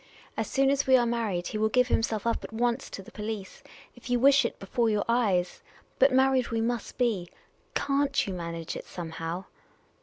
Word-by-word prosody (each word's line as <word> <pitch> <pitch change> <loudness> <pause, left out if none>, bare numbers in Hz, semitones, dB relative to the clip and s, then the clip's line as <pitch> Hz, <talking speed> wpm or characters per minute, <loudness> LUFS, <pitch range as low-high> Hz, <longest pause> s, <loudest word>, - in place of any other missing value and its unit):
As - - -2
soon 270 0 +3
as 280 -1 0
we 260 -1 +7
are 240 - +2
married, 225 -7 -1
he 215 - -3
will 220 0 +2
give 250 +2 +3
himself 225 -1 0
up 230 - 0
at - - -8
once 240 +3 -1
to 195 - -8
the - - -14
police 210 -1 -6 0.2
— - - -23
if 245 +1 -12
you 245 0 +2
wish 275 0 +5
it, - - -3
before 230 +4 0
your 210 -1 0
eyes. 205 -7 +1 0.4
But 270 +1 +6
married 260 -1 +3
we 230 - -1
must 230 0 -2
be. 215 -9 0 0.5
Can't 280 0 +1
you 195 - -4
manage 170 -2 -5
it - - -7
somehow 165 +1 -5
230 Hz, 205 wpm, -28 LUFS, 195-255 Hz, 0.5 s, we